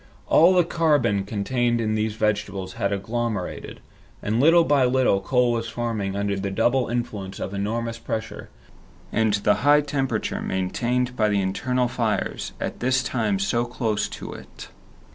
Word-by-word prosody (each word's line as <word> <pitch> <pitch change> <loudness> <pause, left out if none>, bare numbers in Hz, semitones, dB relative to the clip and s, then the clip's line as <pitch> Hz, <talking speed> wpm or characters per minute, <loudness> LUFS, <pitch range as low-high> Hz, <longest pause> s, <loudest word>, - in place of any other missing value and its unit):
All 175 +4 +5
the 180 - +5
carbon 145 - +1
contained 120 +3 0
in 110 -1 0
these 110 0 -1
vegetables 100 -3 -1
had 100 - -1
agglomerated, 110 0 -3 0.4
and 110 +3 0
little 165 +5 +6
by 145 -4 +3
little 125 -6 +2
coal 125 +3 +2
was 115 -1 -2
forming 110 -4 -3
under 100 0 -1
the 100 0 -3
double 120 +5 +1
influence 115 -5 -4
of 100 - -4
enormous 115 +4 -2
pressure 110 -1 -5 0.6
and 110 -2 +2
the 105 0 +2
high 145 +2 +5
temperature 140 -2 -2
maintained 125 +7 -1
by 110 -3 +2
the 100 -1 +1
internal 125 +7 0
fires, 115 -4 -2
at - - -4
this 130 +1 +1
time 110 -6 0
so 100 +5 0
close 115 -3 -2
to - - -7
it. - - -11
115 Hz, 155 wpm, -24 LUFS, 100-125 Hz, 0.6 s, little